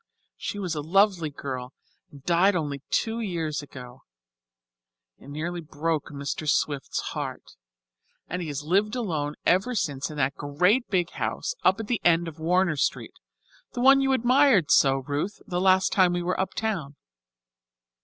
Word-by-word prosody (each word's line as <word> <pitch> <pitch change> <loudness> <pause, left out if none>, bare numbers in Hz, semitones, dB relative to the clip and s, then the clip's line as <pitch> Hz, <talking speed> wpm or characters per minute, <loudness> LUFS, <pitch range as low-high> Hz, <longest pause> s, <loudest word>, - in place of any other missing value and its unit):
She - - -5
was 185 -5 -3
a 150 - -3
lovely 180 0 +2
girl 130 -3 -6 0.4
and 140 -2 -15
died 180 +3 +3
only 145 -5 -2
two 225 0 0
years 165 -9 -2
ago. 130 -3 -11 1.2
It - - -15
nearly 165 +4 -4
broke 155 0 -2
Mr. 145 +1 -4
Swift's 140 -2 0
heart. - - -6 0.8
And 180 +2 -4
he 170 - -4
has 145 -1 -4
lived 200 +8 +1
alone 155 -11 -2
ever 190 +8 +2
since 140 -9 -2
in 150 - -8
that 140 0 +1
great 180 - +1
big 180 -3 0
house - - -3
up 190 - +3
at 225 - -4
the 235 +1 -1
head 170 0 +3
of 160 -1 -9
Warner 175 0 +1
Street, - - -1 0.6
the 245 - -3
one 270 +2 +6
you 270 0 +2
admired 255 - +4
so, 135 -1 +4
Ruth, 150 +8 -3
the 175 -1 -2
last 190 0 +4
time 185 -2 +4
we 175 0 -1
were 180 +1 -1
uptown. 190 -7 -2
170 Hz, 160 wpm, -26 LUFS, 145-195 Hz, 1.2 s, one